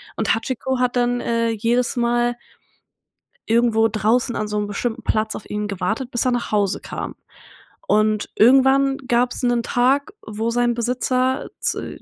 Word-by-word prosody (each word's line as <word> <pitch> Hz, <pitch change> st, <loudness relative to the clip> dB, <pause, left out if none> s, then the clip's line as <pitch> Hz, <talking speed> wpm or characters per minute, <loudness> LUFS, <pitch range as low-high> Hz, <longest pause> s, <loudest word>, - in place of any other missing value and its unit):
und -, -, +1 dB
Hachiko 260 Hz, +2 st, -3 dB
hat 250 Hz, 0 st, 0 dB
dann, 245 Hz, 0 st, +1 dB
äh, 230 Hz, 0 st, 0 dB
jedes 235 Hz, +3 st, 0 dB
Mal 240 Hz, 0 st, +1 dB, 1.1 s
irgendwo 225 Hz, -1 st, +3 dB
draußen 225 Hz, +3 st, +1 dB
an 215 Hz, -, -2 dB
so 210 Hz, -, -2 dB
'nem 210 Hz, 0 st, -1 dB
bestimmten 220 Hz, +3 st, -3 dB
Platz 215 Hz, 0 st, 0 dB
auf -, -, -9 dB
ihn 210 Hz, 0 st, -3 dB
gewartet, 215 Hz, +7 st, -3 dB
bis 240 Hz, -, -1 dB
er 255 Hz, -, +2 dB
nach 245 Hz, -1 st, -2 dB
Hause 205 Hz, -2 st, 0 dB
kam. -, -, -6 dB, 0.7 s
Und 215 Hz, 0 st, +1 dB
irgendwann 270 Hz, +3 st, +4 dB
gab's 245 Hz, +1 st, +1 dB
'nen 240 Hz, -2 st, +1 dB
Tag, 270 Hz, -, +1 dB
wo 220 Hz, +2 st, -3 dB
sein 240 Hz, 0 st, +1 dB
Besitzer 255 Hz, +2 st, -1 dB
z -, -, -3 dB
240 Hz, 155 wpm, -21 LUFS, 220-250 Hz, 1.1 s, irgendwann